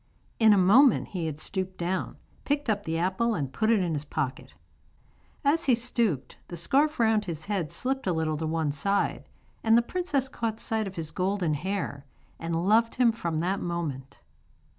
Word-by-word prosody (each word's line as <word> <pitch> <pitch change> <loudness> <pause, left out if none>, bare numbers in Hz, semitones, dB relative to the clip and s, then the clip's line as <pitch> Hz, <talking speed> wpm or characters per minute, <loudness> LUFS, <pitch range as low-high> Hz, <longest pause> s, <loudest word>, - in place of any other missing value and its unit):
In 220 -2 +6
a 205 - +6
moment 220 +8 +5
he 175 -4 -3
had 150 -2 -4
stooped 185 +3 -4
down, 180 +2 -2 0.3
picked 290 -4 0
up 205 -1 -2
the 160 0 -1
apple 190 +7 +1
and 140 -4 -3
put 220 +9 +1
it 225 -4 +4
in 175 -3 -1
his 145 -1 -2
pocket. 140 -2 -4 0.9
As 320 +4 +3
he 255 - +5
stooped 230 - -1
the 175 - -7
scarf 285 - +1
round 220 -2 +3
his 160 -4 -5
head 190 -7 -2
slipped 265 -2 -2
a - - +3
little 160 -2 0
to 160 +1 -2
one 160 -2 0
side, 195 +8 -1 0.3
and 225 0 +5
the 235 - +4
princess 290 -2 -1
caught 230 -4 -3
sight 220 -2 -1
of 190 - -8
his 160 -2 -4
golden 185 -3 0
hair, 170 -3 -3 0.4
and 165 +1 -2
loved 230 +2 +3
him 245 -2 +4
from 170 -8 -2
that 190 +3 0
moment. 155 -7 -4
190 Hz, 185 wpm, -27 LUFS, 165-230 Hz, 0.9 s, In